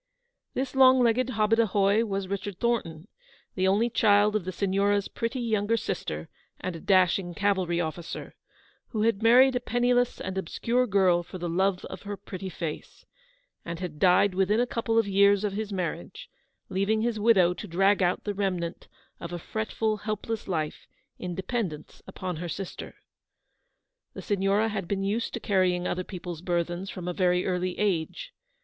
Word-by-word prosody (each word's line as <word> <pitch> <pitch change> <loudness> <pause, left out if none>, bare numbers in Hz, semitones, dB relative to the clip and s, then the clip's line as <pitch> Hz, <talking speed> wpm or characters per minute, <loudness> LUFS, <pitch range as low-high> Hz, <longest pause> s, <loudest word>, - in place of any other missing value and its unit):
This 260 0 -2
long 260 -1 +7
legged 240 +1 +2
hobadahoy 215 -2 +2
was 195 -2 -3
Richard 200 0 -4
Thornton, 190 -8 -1 0.5
the 185 0 +1
only 205 +5 +3
child 210 -2 +3
of 205 -5 -1
the 185 - -3
Signora' 200 +2 +1
s 200 - -2
pretty 230 +3 -3
younger 225 -1 +1
sister 80 - -4 0.3
and 185 -2 -4
a - - -7
dashing 185 -1 +2
cavalry 190 -4 +1
officer, 165 0 -5 0.5
who 215 -3 -2
had 225 -2 +1
married 250 +3 +6
a - - +2
penniless 245 +1 +1
and 190 0 -3
obscure 235 +8 0
girl 190 -4 +3
for 180 +2 -9
the 175 -1 -4
love 185 +2 0
of 185 - -8
her 205 0 -6
pretty 190 -1 -7
face, 165 -4 -6 0.6
and 170 0 -5
had 170 -5 -6
died 185 +2 +4
within 195 +4 +2
a 245 - +3
couple 230 -1 -1
of 225 -2 +3
years 200 +1 +4
of 205 -2 -1
his 215 0 -4
marriage, 195 - -5 0.4
leaving 200 +3 0
his 235 -2 -1
widow 195 -5 +4
to 210 - -8
drag 195 +3 +3
out 180 0 +1
the 205 - -2
remnant 185 -4 -3 0.3
of 170 - -7
a 175 - -3
fretful, 220 +3 -2
help 215 0 -4
less 225 -1 -3
life 155 -5 -3 0.3
in 180 -1 -4
dependence 190 -6 -4
upon 180 -3 -5
her 170 +1 -5
sister. 190 +3 -6 1.2
The - - -7
Signora 200 +2 +1
had 200 -5 -4
been 195 +1 -1
used 210 +4 -1
to - - -3
carrying 185 -4 +1
other 185 - -2
people's 175 -3 -7
burthens 175 +1 -2
from 180 -2 -7
a 180 - -1
very 180 0 +2
early 180 0 -1
age. 210 - -1
195 Hz, 170 wpm, -27 LUFS, 180-220 Hz, 1.2 s, long